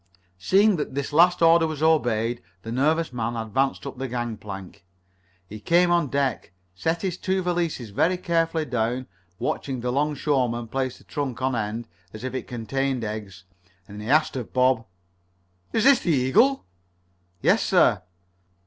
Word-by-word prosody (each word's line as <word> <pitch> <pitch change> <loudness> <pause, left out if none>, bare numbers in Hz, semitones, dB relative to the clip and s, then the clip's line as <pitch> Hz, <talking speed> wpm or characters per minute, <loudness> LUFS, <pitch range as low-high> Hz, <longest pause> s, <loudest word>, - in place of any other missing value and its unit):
Seeing 195 - +4
that 150 -3 -4
this 140 0 -3
last 175 +2 +5
order 165 0 +6
was 155 -1 -4
obeyed, 120 -8 +2 0.2
the 115 - -6
nervous 150 +4 +1
man 120 -1 -2
advanced 115 +6 -1
up 135 -2 -7
the 135 - -2
gangplank. 105 -7 -6 0.6
He 105 +4 -9
came 175 +9 +3
on 170 -3 +2
deck, 135 -9 -2 0.2
set 160 - -2
his 185 -2 -2
two 190 0 -1
valises 170 - -2
very 180 - +1
carefully 165 -2 0
down, 125 0 -1 0.3
watched - - -2
the 125 -2 -2
'longshoreman 135 -4 0
place 130 +1 -2
the - - -19
trunk 140 -5 -4
on 130 -1 +1
end, 115 +1 -3 0.3
as 110 +1 -9
if 130 - -4
it 130 - -4
contained 130 +2 -2
eggs, 105 -4 -6 0.4
and 105 +1 -10
then 105 - -7
he - - 0
asked 155 -1 +3
of 125 -4 -5
Bob: 125 -3 +2 0.8
"Is 225 - +1
this 270 -1 +6
ship - - -13
the 170 - +3
Eagle?" 230 - +3 0.8
"Yes, - - +4
sir." - - +3
130 Hz, 165 wpm, -24 LUFS, 115-160 Hz, 0.8 s, order